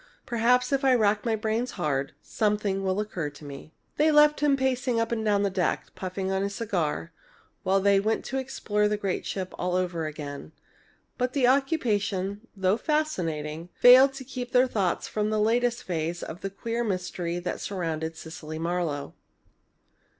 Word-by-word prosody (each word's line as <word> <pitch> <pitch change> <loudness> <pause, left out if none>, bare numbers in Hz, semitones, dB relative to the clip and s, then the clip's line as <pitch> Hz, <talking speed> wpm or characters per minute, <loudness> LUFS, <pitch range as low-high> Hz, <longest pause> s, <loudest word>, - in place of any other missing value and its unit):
Perhaps, 250 +2 +2
if 275 0 +1
I 265 -1 +5
rack 210 -2 +2
my 225 - +2
brains 220 +3 -1
hard, 140 -6 -1
something 205 -2 0
will 190 +1 0
occur 185 -8 -3
to 145 +1 -14
me." 140 +2 -9 0.3
They 310 +1 +4
left 300 0 +5
him 290 -1 +3
pacing 255 -2 0
up 230 0 -1
and 225 -2 -1
down 210 -1 +2
on 200 - +2
the 200 - +1
deck, 185 -2 -1
puffing 190 +1 -4
at 190 0 0
his 200 0 -2
cigar, 170 -7 -2 0.5
while 195 +1 +2
they 200 0 +4
went 220 +3 0
to 265 - -2
explore 210 -5 0
the 210 0 0
great 195 -3 -2
ship 185 -2 -4
all 180 0 0
over 175 -3 -1
again. 145 0 -7 0.7
But 250 0 0
the 275 -3 +3
occupation, 220 - +1
though 190 +2 +2
fascinating, 170 - -2
failed 260 +2 +8
to 270 0 -7
keep 250 -1 -6
their 250 +1 +6
thoughts 200 -8 -1
from 210 0 -1
the 215 0 0
latest 240 +2 +1
phase 170 -1 -3
of 165 - -7
the 195 - -3
queer 230 +4 -3
mystery 180 -4 -2
that 175 0 -4
surrounded 165 -4 -3
Cecily 155 -1 -8
Marlowe. 165 -3 -2
205 Hz, 175 wpm, -27 LUFS, 175-240 Hz, 0.7 s, failed